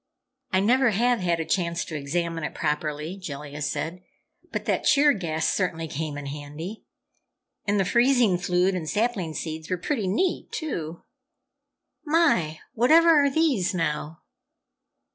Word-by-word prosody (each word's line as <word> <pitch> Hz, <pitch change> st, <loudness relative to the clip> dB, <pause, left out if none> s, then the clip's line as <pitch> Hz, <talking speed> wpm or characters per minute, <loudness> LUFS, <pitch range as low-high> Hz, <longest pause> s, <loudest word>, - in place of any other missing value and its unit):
"I 190 Hz, -, +3 dB
never 250 Hz, +5 st, +4 dB
have 240 Hz, +3 st, +2 dB
had 175 Hz, -2 st, 0 dB
a 165 Hz, -, -2 dB
chance 170 Hz, -2 st, -1 dB
to 160 Hz, -, -7 dB
examine 165 Hz, +3 st, -2 dB
it -, -, -4 dB
properly," 150 Hz, +3 st, -2 dB
Jellia 150 Hz, -4 st, -7 dB
said. 160 Hz, +4 st, -3 dB, 0.5 s
"But -, -, -3 dB
that -, -, 0 dB
cheer 295 Hz, 0 st, +5 dB
gas 160 Hz, -5 st, -2 dB
certainly 165 Hz, -4 st, -1 dB
came 150 Hz, -1 st, -4 dB
in 145 Hz, -, -6 dB
handy, 150 Hz, +8 st, -7 dB, 0.8 s
and 205 Hz, 0 st, +2 dB
the 195 Hz, -, +2 dB
freezing 235 Hz, -4 st, +3 dB
fluid 180 Hz, +1 st, +1 dB
and 165 Hz, -4 st, -3 dB
sapling 205 Hz, -8 st, -1 dB
seeds 160 Hz, -1 st, -5 dB
were 185 Hz, -, 0 dB
pretty 215 Hz, -, -2 dB
neat, 295 Hz, -, 0 dB
too! 170 Hz, -, -4 dB, 1.0 s
My, 295 Hz, -, +2 dB
whatever 315 Hz, +8 st, +5 dB
are 280 Hz, -, +3 dB
these, 270 Hz, -, +1 dB
now?" 155 Hz, -1 st, -2 dB
180 Hz, 145 wpm, -25 LUFS, 155-235 Hz, 1.0 s, cheer